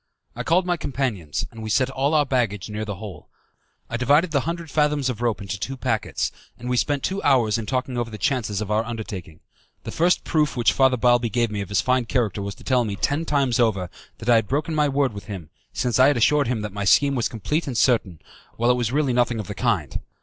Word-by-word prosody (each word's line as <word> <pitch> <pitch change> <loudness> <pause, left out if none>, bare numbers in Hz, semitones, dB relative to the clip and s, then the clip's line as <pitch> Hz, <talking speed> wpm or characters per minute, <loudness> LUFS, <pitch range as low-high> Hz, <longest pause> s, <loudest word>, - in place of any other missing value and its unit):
I - - -4
called 175 +2 +2
my 175 -1 0
companions, 120 - -2
and 115 -1 -10
we 110 - -5
set 130 +5 +2
all 140 +3 0
our 150 -1 +4
baggage 110 -7 -1
near 105 +1 -3
the 105 -2 -4
hole. 100 0 -10 0.6
I 120 - -3
divided 145 +8 +3
the 145 - +2
hundred 170 -2 -5
fathoms 150 -3 +1
of 115 -2 -8
rope 115 -4 -1
into 100 0 -5
two 135 +6 -4
packets, 120 -4 -1 0.3
and 120 - -8
we - - +2
spent 140 +2 0
two 195 +1 -1
hours 120 -6 +3
in 110 - -6
talking 130 0 -2
over 120 -1 -2
the 110 - -7
chances 115 -7 -1
of 105 -1 -4
our 110 +1 +2
undertaking. 110 -8 -7 0.4
The - - -6
first 175 +2 +2
proof 150 -5 0
which 120 - +3
Father 130 -1 +3
Balbi 120 0 +3
gave 115 +1 0
me 105 -1 -3
of 100 - -6
his 100 - +2
fine 130 -1 +1
character 115 -5 -1
was 100 0 -5
to - - -16
tell 125 -2 +2
me, 105 -3 -3
ten 145 +10 -1
times 135 -5 +1
over, 95 -7 +1 0.3
that 110 - -10
I 120 - +7
had 110 -2 0
broken 150 +4 -1
my 150 -1 +2
word 140 -3 +1
with 100 - -8
him, 90 -7 -8 0.2
since 125 0 -1
I 130 - +7
had 145 - +3
assured 145 +3 +3
him 120 -3 -1
that 105 -2 -5
my 100 0 -3
scheme 140 +8 +4
was 120 -4 0
complete 145 - -2
and 125 -4 -3
certain, 110 - +2 0.4
while 120 +2 +3
it 125 - +1
was 120 -2 -1
really 140 -2 +1
nothing 120 -1 +1
of 105 - -4
the 105 - -6
kind. 100 - -1
120 Hz, 245 wpm, -23 LUFS, 105-140 Hz, 0.6 s, I